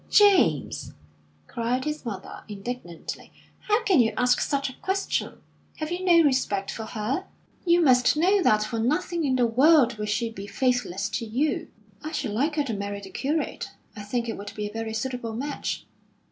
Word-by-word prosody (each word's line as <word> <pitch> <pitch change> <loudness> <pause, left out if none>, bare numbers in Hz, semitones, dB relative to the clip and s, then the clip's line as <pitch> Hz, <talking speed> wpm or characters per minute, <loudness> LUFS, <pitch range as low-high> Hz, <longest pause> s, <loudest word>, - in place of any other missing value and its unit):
"James!" 385 - +4 0.5
cried 240 - -2
his 300 0 -3
mother, 200 -6 -7
indignantly, 205 -4 -7 0.3
"how 425 +2 +1
can 380 -9 +4
you 225 -2 +3
ask 245 0 +3
such 280 -1 0
a 260 - -7
question? 390 +1 -2 0.3
Have 310 +1 -4
you 355 +1 -2
no 340 -2 +6
respect 255 -9 +1
for 220 - -5
her? 230 - -2 0.4
You 345 0 +5
must 255 -2 +4
know 380 +5 +4
that 215 -9 +4
for 225 +1 -3
nothing 315 +7 0
in 260 -2 +2
the 250 -1 +3
world 250 -1 +4
would 210 0 -2
she 225 +2 0
be 200 -2 -8
faithless 220 -3 0
to 220 +3 -3
you." 305 +8 0 0.4
"I 310 +1 -5
should 290 -8 -2
like 285 +9 0
her 295 - +2
to 250 -5 -3
marry 200 0 -4
the 195 -1 -11
curate. 300 +4 -2 0.3
I 210 - -7
think 235 +3 -2
it 225 - -3
would 205 0 -7
be 210 - -3
a 205 - -10
very 225 0 -4
suitable 235 -1 -3
match." 280 +4 -3
250 Hz, 185 wpm, -26 LUFS, 215-305 Hz, 0.5 s, no